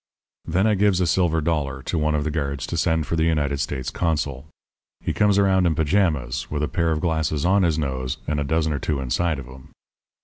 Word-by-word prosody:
"Then 95 +5 +1
I 110 - +3
gives 100 -2 +2
a 90 - +2
silver 85 -1 +2
dollar 70 -4 -1
to - - -3
one 75 0 +1
of 75 - 0
the 75 - -2
guards 70 -3 -2
to - - -4
send 80 -2 +1
for 85 - -2
the 80 - +1
United 75 -4 +1
States 65 -3 -3
consul. 75 -4 -2 0.5
He - - -3
comes 105 -2 +3
around 95 -2 +3
in 80 - +1
pajamas, 75 -6 0
with 75 0 -2
a - - +1
pair 85 0 0
of 80 -1 -1
glasses 80 -3 0
on 95 +2 +4
his 85 -4 +2
nose 65 -4 -2
and 75 -1 -1
a - - 0
dozen 80 +1 0
or 70 - -2
two 75 +1 -1
inside 75 +5 0
of 70 - -7
him. 65 +1 -13
80 Hz, 230 wpm, -23 LUFS, 70-85 Hz, 0.5 s, on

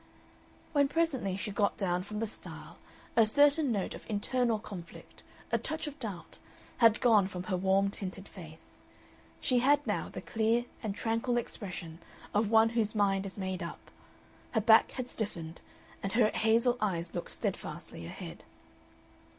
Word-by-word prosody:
When 285 -2 +4
presently 275 - 0
she 210 +1 -3
got 200 0 +1
down 180 -3 0
from 210 +3 -6
the 225 - 0
stile 215 - -7 0.4
a 225 -2 +6
certain 285 +3 +4
note 200 -4 -1
of - - -11
internal 230 +2 +1
conflict, 195 -5 -10 0.3
a - - +2
touch 315 +1 -3
of 295 0 -7
doubt, 205 -8 -7 0.4
had 230 -3 +5
gone 215 -6 +5
from 180 -2 -6
her 185 0 -1
warm 195 +2 +2
tinted 195 0 -6
face. 160 -4 -13 0.6
She 250 -3 +2
had 290 +3 +3
now - - -1
the - - -6
clear 225 +2 +1 0.2
and 210 -3 -3
tranquil 230 +2 0
expression 180 -8 -5 0.3
of 210 0 +2
one 225 0 +6
whose 225 -2 0
mind 195 -1 +2
is 190 - -8
made 190 -1 -3
up. 170 - -8 0.6
Her 220 - +2
back 220 +1 +6
had 255 -2 -4
stiffened, 170 -9 -5 0.4
and 195 - -3
her 225 -2 +4
hazel 230 +3 +2
eyes 175 -5 -1
looked - - -4
steadfastly 85 - -4
ahead. - - -8
215 Hz, 160 wpm, -31 LUFS, 190-240 Hz, 0.6 s, a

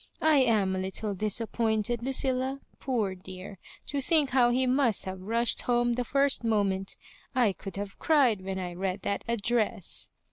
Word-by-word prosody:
I 315 -1 +5
am 215 -7 +2
a - - -2
little 190 +2 -3
disappointed, 220 +2 0
Lu 255 - -3
cilla. 265 0 0 0.2
Poor 225 -8 -1
dearl 185 +1 -10 0.3
to 285 -1 -3
think 295 -1 +2
how 245 -2 +4
he 255 +2 +2
must 255 -4 +1
have 190 0 -6
rushed 230 +4 +1
home 240 0 +1
the 250 +1 -1
first 275 +1 +2
moment 200 -4 0 0.2
— - - -29
^I 230 -7 +3
could 195 - -8
have 200 0 -6
cried 265 -10 +3
when 190 0 -4
I 180 -2 -4
read 190 +2 -3
that 200 - -2
address." 235 -1 0
225 Hz, 175 wpm, -28 LUFS, 195-255 Hz, 0.3 s, I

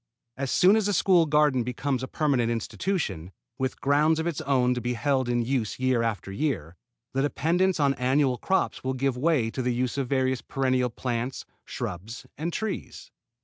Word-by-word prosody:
As 135 0 -3
soon 190 - +5
as 220 -2 +2
a 205 - +1
school 175 -4 +4
garden 150 -3 +3
becomes 125 +2 -2
a 130 - -4
permanent 130 -7 +1
institution, 115 - -2 0.3
with 130 0 -2
ground 150 +3 +3
of 160 - -2
its 170 -4 -2
own 125 -3 +2
to 125 - -3
be 125 0 -2
held 130 0 0
in 120 -1 +1
use 120 -3 -1
year 130 -2 +2
after 105 -4 -2
year, 95 - -2 0.4
the 135 - +1
dependence 170 +6 +1
on 140 -2 +3
annual 130 0 +1
crops 190 - 0
will 130 0 -1
give 135 0 0
way 130 -4 +1
to 130 - -3
the 125 -1 0
use 125 +2 -1
of 130 -3 -2
various 130 -2 +1
perennial 130 -2 0
plants, 120 +1 -3 0.2
shrubs 100 +7 -6
and 160 +4 -3
trees. 215 +2 -5
130 Hz, 185 wpm, -26 LUFS, 120-150 Hz, 0.4 s, soon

